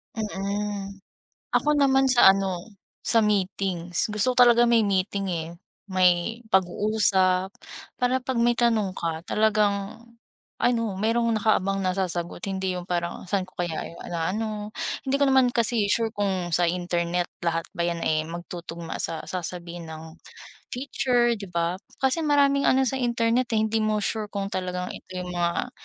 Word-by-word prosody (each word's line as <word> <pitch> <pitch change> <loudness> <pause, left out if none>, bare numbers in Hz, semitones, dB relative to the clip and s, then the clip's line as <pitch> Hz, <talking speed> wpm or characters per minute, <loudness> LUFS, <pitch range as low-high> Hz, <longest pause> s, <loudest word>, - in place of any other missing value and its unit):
Mm, 200 -1 -3 0.6
ako 300 - +3
naman, 270 -1 +4
sa 240 -6 +7
ano, 190 -3 -3 0.4
sa 230 -1 +4
meetings. 190 -3 0
Gusto 215 +4 +2
ko - - -24
talaga 240 0 +6
may 235 -1 +4
meeting, 195 -1 0
eh, 165 -2 -3 0.4
may 185 +4 +2
pag-uusap 190 0 +2 0.5
para 250 +1 +2
'pag 260 0 -4
may 240 0 +3
tanong 220 -6 +1
ka 165 -1 -2
talagang 210 -1 +1 0.6
ano, 230 -4 +1
mayrong 230 +3 +1
nakaabang 195 -3 +1
na 185 - +1
sasagot. 175 -3 -3
Hindi 190 -1 -2
yung 175 - -8
parang, 175 +1 -3
"Saan 195 -1 0
ko 185 - -20
kaya 175 -3 -3 0.2
na 170 +1 -1
ano." 215 0 -4 0.4
Hindi 275 +1 +1
ko 280 - +3
naman 265 -2 +4
kasi 230 -2 +2
sure 225 0 +2
kung 190 -4 -1
sa 175 - +3
internet 175 0 -1 0.2
lahat 165 -1 -1
ba 170 - 0
yan, 170 -1 -1
eh, 155 0 +1
magtutugma 170 0 -7
sa 165 -1 0
sasabihin 175 -1 -5
ng 160 0 -9 0.6
teacher, 245 -2 +1
di 205 -3 -7
ba? 170 0 -1 0.3
Kasi 265 +5 +2
maraming 280 -2 +3
ano 265 +1 +3
sa 265 +1 -1
internet, 235 0 +1
eh, - - +3
hindi 220 +1 0
mo 215 0 +1
sure 215 +1 -1
kung 200 -1 -3
talagang 180 -1 -3
ito - - -11
yung 180 0 -5
mga 175 +7 -1
195 Hz, 155 wpm, -25 LUFS, 175-230 Hz, 0.6 s, sa